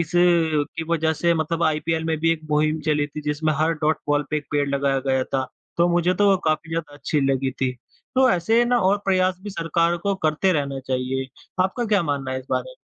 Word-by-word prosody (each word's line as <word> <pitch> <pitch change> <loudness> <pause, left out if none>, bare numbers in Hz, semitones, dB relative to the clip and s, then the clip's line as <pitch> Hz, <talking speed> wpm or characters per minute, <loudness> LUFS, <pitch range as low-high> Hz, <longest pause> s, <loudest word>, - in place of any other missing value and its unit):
इस 165 -1 -3
की 165 -3 +2
वज़ह 160 -1 +1
से 170 +2 +1
मतलब 165 +1 -1
आईपीएल 160 +1 0
में 160 -1 0
भी 165 +1 +3
एक 165 - -4
मुहिम 155 +1 +1
चली 150 -1 +2
थी, 150 +1 -7
जिसमें 150 +1 0
हर 160 +2 +2
डॉट 155 +1 +3
बॉल 145 0 +2
पे 155 - +1
1 150 - -5
पेड़ 145 -1 +1
लगाया 140 -1 +1
गया 130 -1 +2
था, 135 -1 -1 0.3
तो 170 +1 +3
मुझे 175 +1 +2
तो 205 +2 +3
वो 195 - +5
काफ़ी 155 +2 -1
ज़्यादा 165 -3 -4
अच्छी 145 +1 -1
लगी 135 0 0
थी। 130 -1 -2 0.4
तो 260 0 +5
ऐसे 180 +6 +2
है 240 - +4
ना, 245 0 +2
और 195 +2 +3
प्रयास 185 -1 +2
भी 210 - -6
सरकार 170 -1 0
को 200 +3 -1
करते 155 +5 +2
रहना 140 -4 -1
चाहिए। 130 0 -2 0.4
आपका 215 +6 -1
क्या 210 -4 +2
मानना 140 -4 -2
है 130 - -2
इस 130 - -12
बारे? - - -2
160 Hz, 230 wpm, -23 LUFS, 145-175 Hz, 0.4 s, वो